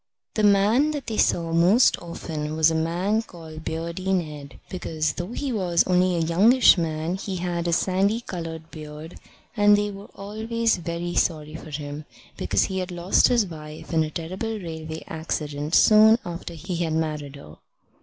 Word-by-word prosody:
The 215 - 0
man 210 +8 +4
that 275 - -7
they 220 - -4
saw 165 -1 +1
most 180 +9 +5
often 155 -3 -5
was 160 0 +4
a - - -1
man 175 +7 0
called 160 -6 -11
Beardy 170 +4 -3
Ned, 150 -6 -3
because, 155 -5 -2
though 175 +6 -5
he 275 -1 -3
was 180 -5 +2
only 180 0 +2
a 165 -1 0
youngish 215 +10 +6
man, 165 0 -2
he 195 0 -5
had 175 -1 -2
a - - +1
sandy 195 +6 +1
coloured 165 -5 -7
beard; 155 +1 -9 0.4
and 205 -1 +5
they 205 0 -1
were 200 0 -11
always 220 +3 -1
very 170 0 -4
sorry 155 -3 0
for 160 0 -9
him, 145 0 -6 0.3
because - - +1
he 190 -1 -2
had 185 0 -3
lost 175 +1 +3
his 235 -4 +3
wife 155 -1 -9
in 160 -1 +3
a 155 - -3
terrible 185 +8 -4
railway 160 -4 -7
accident 150 -1 -3
soon 215 +1 +7
after 170 0 -6
he 175 +2 -5
had 165 -2 -1
married 150 -3 -2
her. 75 - -13
170 Hz, 175 wpm, -24 LUFS, 160-195 Hz, 0.4 s, soon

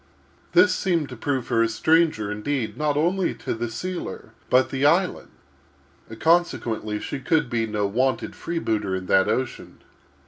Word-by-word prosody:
This - - +6
seemed 170 -6 0
to 125 - -7
prove 130 +1 -2
her 115 - +2
a 115 - +2
stranger, 155 -4 +2
indeed, 110 +1 -2
not 150 +1 0
only 175 +4 +1
to - - -4
the 115 +1 -3
sealer, 175 0 -6 0.2
but 130 +1 +3
the 135 0 -2
island; 170 +5 +2 0.9
consequently, 115 -11 +1
she 140 - -5
could 135 -1 0
be 115 -1 0
no 105 -1 -1
wonted 125 +5 0
freebooter 110 - -2
on 95 - -7
that 95 +1 +3
ocean. 130 -1 -3
130 Hz, 150 wpm, -24 LUFS, 110-160 Hz, 0.9 s, This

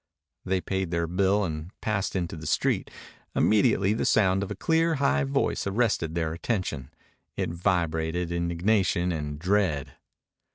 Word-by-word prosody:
They 95 0 0
paid 95 -1 -2
their 85 -1 0
bill 95 +4 +2
and 80 -2 -4
passed 100 -3 -1
into 85 -3 -2
the 80 -1 -7
street. - - +1 0.5
Immediately 105 -2 +3
the 110 - -1
sound 95 -3 +3
of 100 - -3
a 105 - -4
clear, 165 - +2
high 70 - +2
voice 70 +7 0
arrested 100 -6 0
their 80 -2 -1
attention. 85 - -3 0.5
It - - -1
vibrated 85 -1 0
indignation 85 +1 +1
and 75 -3 -4
dread. 90 -4 0
90 Hz, 140 wpm, -27 LUFS, 80-100 Hz, 0.5 s, Immediately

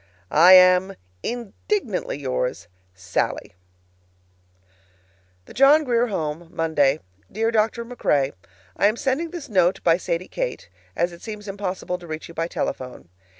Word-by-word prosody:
I 175 +5 +7
am, 185 +1 +6 0.3
Indignantly 240 - -3
yours, 125 -7 -3 0.3
SALLIE. 95 -1 -3 1.9
THE - - -13
JOHN 285 +4 +6
GRIER 240 -3 +1
HOME, 165 -4 -4
Monday. 155 -3 +1 0.3
Dear 225 +3 0
Dr. 225 +1 0
MacRae: 145 - 0 0.4
I 200 - +3
am 215 - +1
sending 275 +7 -1
this 340 -3 -7
note 185 -4 +2
by 165 -1 +4
Sadie 175 0 -3
Kate, - - -5 0.2
as 175 +1 0
it 170 - -13
seems 210 -2 -8
impossible 190 -2 -4
to 175 - -12
reach 155 0 -6
you 170 - -12
by 165 0 -2
telephone. 125 - -5
185 Hz, 135 wpm, -23 LUFS, 165-230 Hz, 1.9 s, I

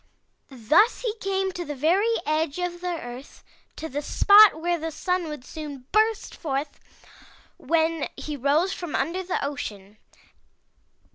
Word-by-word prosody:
Thus 285 - +3
he 465 -4 -1
came 385 -1 -1
to 355 -1 -5
the 295 -3 -6
very 375 - +2
edge 310 0 0
of 355 -1 -3
the 360 - -4
earth, 245 +3 -10 0.3
to 320 - -6
the 290 0 -4
spot 405 +3 +6
where 345 +1 0
the 325 +1 -3
Sun 360 +2 -2
would 300 -4 -8
soon 290 -5 -8
burst 435 +1 +1
forth 285 -2 -4 0.8
when 325 -1 0
he 300 - -5
rose 295 +8 +1
from 350 -4 -5
under 335 +7 -1
the 370 0 -2
ocean. 210 -7 -6
320 Hz, 145 wpm, -25 LUFS, 285-370 Hz, 0.8 s, spot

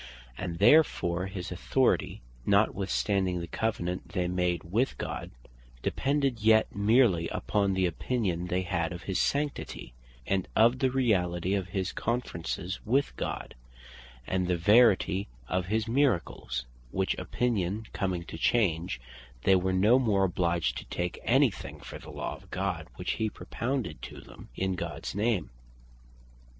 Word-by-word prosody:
And 85 +5 -4
therefore 95 - +4
his 95 0 -6
authority 125 +8 +1 0.2
(notwithstanding 100 - +1
the 85 - -4
Covenant 90 -1 -3
they 90 -1 0
made 90 -2 0
with 110 +11 0
God) - - -4 0.5
depended 140 -3 0
yet 110 +1 +4
merely 100 -5 +4
upon 100 - 0
the 95 0 +2
opinion 90 -1 -1
they 90 +1 0
had 85 -1 -1
of 85 - -8
his 95 -2 0
Sanctity, 145 - -2 0.3
and 95 -2 0
of 120 +3 +5
the 130 - +3
reality 95 -8 +1
of 95 -2 -1
his 95 -1 -2
Conferences 95 -5 -3
with 135 +5 +1
God, - - -4 0.7
and 90 +3 0
the 90 -1 +1
verity 100 0 +4 0.2
of 90 +3 -1
his 110 +2 0
Miracles; 105 - 0 0.2
which 95 +7 0
opinion 110 -3 -1
coming 90 -3 -1
to 80 - -8
change, 90 - +1 0.4
they 95 - +5
were 95 0 +1
no 105 +7 +5
more 105 -6 +2
obliged 85 -4 0
to - - -10
take 90 0 -3
any - - +5
thing - - -9
for - - -9
the - - -12
law - - -4
of - - -19
God, - - -2
which - - -2
he 110 -1 -1
propounded 115 - -3
to - - -8
them - - -13
in 95 0 0
Gods 90 - -5
name. 105 - 0
95 Hz, 145 wpm, -29 LUFS, 90-110 Hz, 0.7 s, of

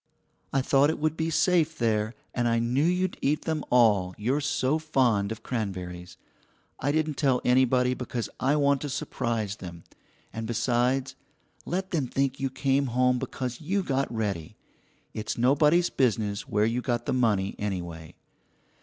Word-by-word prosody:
I 135 -1 +1
thought 140 +2 +4
it - - -1
would 155 0 0
be 160 0 -1
safe 160 0 +2
there, 110 -1 0 0.2
and 120 -1 0
I 115 0 +2
knew 120 +5 +1
you'd 180 +2 +1
eat 150 +2 +1
them 160 -2 -2
all, 105 -7 +3
you're 130 +8 0
so 145 +1 0
fond 125 -10 +1
of 110 0 -6
cranberries. 90 -6 -5 0.6
I 145 - 0
didn't 155 -1 0
tell 130 -4 +2
anybody 125 0 +3
because 125 -3 -4
I 140 +3 +2
want 140 -2 +2
to 145 - -4
surprise 115 -6 -2
them, 85 -3 -9 0.5
and 110 0 -4
besides, 120 +3 0 0.5
let 190 +2 -2
them 150 -7 0
think 135 +1 -1
you 135 - -1
came 135 +1 +1
home 125 +1 +2
because 125 +1 -5
you 190 +5 0
got 135 -5 -1
ready. 100 -8 -3 0.6
It's 110 0 -4
nobody's 150 +8 +3
business 110 -5 0
where 105 +1 +2
you 115 +2 0
got 120 -2 -2
the - - 0
money 105 -6 +1
anyway. 85 -6 -5
125 Hz, 160 wpm, -27 LUFS, 110-145 Hz, 0.6 s, thought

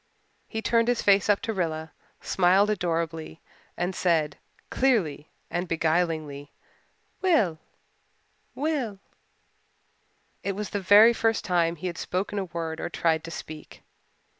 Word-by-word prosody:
He 220 -1 -5
turned 230 +1 +2
his 245 -1 +1
face 200 0 +4
up 205 - +3
to 225 - -2
Rilla, 160 -4 -3 0.3
smiled 190 +3 +3
adorably 165 -4 -2 0.4
and 180 +2 -1
said, 160 -5 +1 0.4
clearly 190 - +1 0.2
and 175 +1 -2
beguilingly, 160 -3 -1 0.7
"Will 220 - +2 1.0
Will." 275 -8 -2 1.4
It 200 - -2
was 205 +1 -5
the 205 - -2
very 210 +5 +7
first 225 -1 0
time 170 -3 +1
he 170 - -9
had 175 -2 -3
spoken 200 +3 -2
a 195 - -2
word 165 -2 -5
or - - -3
tried 160 -2 0
to - - -7
speak. 155 -2 -9
180 Hz, 130 wpm, -26 LUFS, 165-210 Hz, 1.4 s, very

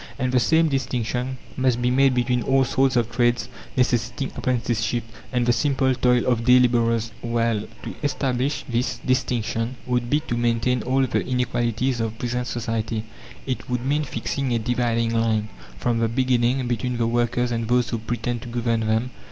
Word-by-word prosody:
And 130 0 -1
the 130 - +4
same 160 +7 +3
distinction 130 -2 -2 0.2
must 130 -2 +1
be 125 0 +1
made 135 0 +4
between 125 0 +1
all 135 +2 +3
sorts 130 +1 +2
of 115 -1 +1
trades 120 0 +1 0.3
necessitating 125 +2 0
apprenticeship, 120 -1 -1 0.3
and 125 -2 +1
the 120 - +4
simple 130 +1 +2
toil 125 -1 +2
of 120 -2 +1
day 125 +1 +6
labourers. 115 -2 +2
Well, 115 -2 0 0.2
to - - -5
establish 135 -1 -1
this 120 0 -1
distinction 125 -2 0
would 125 -1 -1
be 150 - +3
to 135 -6 -3
maintain 120 +1 +1
all 130 +3 +2
the 125 - 0
inequalities 125 0 0
of 115 -1 -2
present 125 +1 -2
society. 115 -2 -2 0.4
It 130 -1 -4
would 125 0 -2
mean 145 +3 +1
fixing 135 0 -3
a - - +2
dividing 115 0 0
line, 110 -2 +1 0.3
from 120 -2 0
the 115 - +2
beginning, 125 +1 +1
between 120 +1 -1
the 115 - +1
workers 120 +1 +1
and 115 -1 -1
those 120 0 +2
who 115 - -1
pretend 120 +1 -3
to - - -9
govern 115 -1 0
them. 110 +3 0
120 Hz, 175 wpm, -23 LUFS, 115-125 Hz, 0.4 s, day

